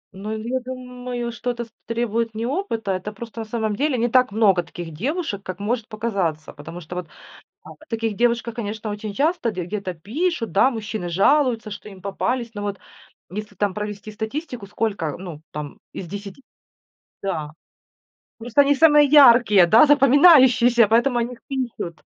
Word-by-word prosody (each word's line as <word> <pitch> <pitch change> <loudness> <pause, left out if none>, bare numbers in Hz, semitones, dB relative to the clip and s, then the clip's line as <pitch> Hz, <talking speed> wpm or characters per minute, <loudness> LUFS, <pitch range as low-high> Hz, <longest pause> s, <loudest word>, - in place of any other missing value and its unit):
Ну 205 +3 -6
я 240 +4 -2
думаю, 250 -1 -6
что 245 +1 -5
это 235 0 -5
с 225 - -24 0.2
требует 230 -1 -1
не 225 +1 -3
опыта. 245 - -2
Это 185 +3 -3
просто, 230 +2 -9
на - - -5
самом 220 -2 -2
деле, 280 0 0
не 235 +1 +1
так 255 -2 +3
много 200 -4 +3
таких 170 -1 -9
девушек, 255 - -3
как 185 +1 -7
может 225 +2 -2
показаться. 195 -8 -3
Потому 165 +4 -9
что 175 +3 -9
вот, 180 -3 -5 0.6
да, - - -11
о 310 - -18
таких 225 -2 -2
девушках, 235 0 0
конечно, 215 -1 -5
очень 210 0 -5
часто 295 - 0
де 180 -4 -4
где-то 190 0 -4
пишут, 235 - -2
да, 230 +7 +4
мужчины 215 -5 -5
жалуются, 230 - +2
что 210 - -9
им 190 -2 -12
попались. 230 +4 -2
Но 205 - -5
вот 200 -1 -3 0.5
если 205 +2 -7
там 200 -1 -1
провести 210 0 -6
статистику, 230 +1 -5
сколько, 205 -6 -2
э, 145 - -4
ну 170 -5 -9
там 150 -1 -7
из 185 - -7
10, 200 +6 -8 0.8
да. 160 -6 -3 0.9
Просто 240 +4 +2
они 285 +1 +4
самые 295 0 +6
яркие, 235 -9 +7
да, 225 - +6
запоминающиеся, 260 - +6
поэтому 240 +3 +2
о - - +1
них 245 0 -7
пишут. 240 - -4
225 Hz, 175 wpm, -22 LUFS, 200-250 Hz, 0.9 s, яркие